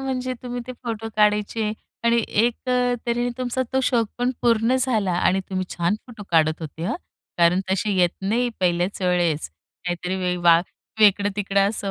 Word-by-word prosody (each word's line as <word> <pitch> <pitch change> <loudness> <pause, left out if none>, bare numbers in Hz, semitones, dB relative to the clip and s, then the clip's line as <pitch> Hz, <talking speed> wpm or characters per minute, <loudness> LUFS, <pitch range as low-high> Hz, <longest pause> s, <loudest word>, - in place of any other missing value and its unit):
म्हणजे 255 -1 -2
तुम्ही 245 0 -4
ते 255 - -5
फोटो 225 -2 -4
काढायचे 210 +1 +2 0.3
आणि 235 0 +3
एक 230 +3 +2
अ, 250 -1 +2
तऱ्हेने 240 +1 0
तुमचा 255 0 -1
तो 265 - +2
शौक 235 -4 +2
पण 245 +1 +1
पूर्ण 230 +1 +3
झाला 220 -8 +1
आणि 190 +2 +2
तुम्ही 185 -1 -1
छान 175 +3 0
फोटो 225 -4 -10
काढत 160 -1 +3
होते 160 +1 -7
हं. - - -1 0.4
कारण 175 +2 +4
तसे 195 +2 0
येत 175 -2 +4
नाही 230 +5 +1
पहिल्याच 180 +2 0
वेळेस. 175 - +1 0.4
काहीतरी 180 +1 -2
वे 180 -1 -1
वा 170 -1 +6 0.4
वेकडं 205 -1 +5
तिकडं 200 -1 +2
असं 200 -2 -3
205 Hz, 170 wpm, -23 LUFS, 180-240 Hz, 0.4 s, वा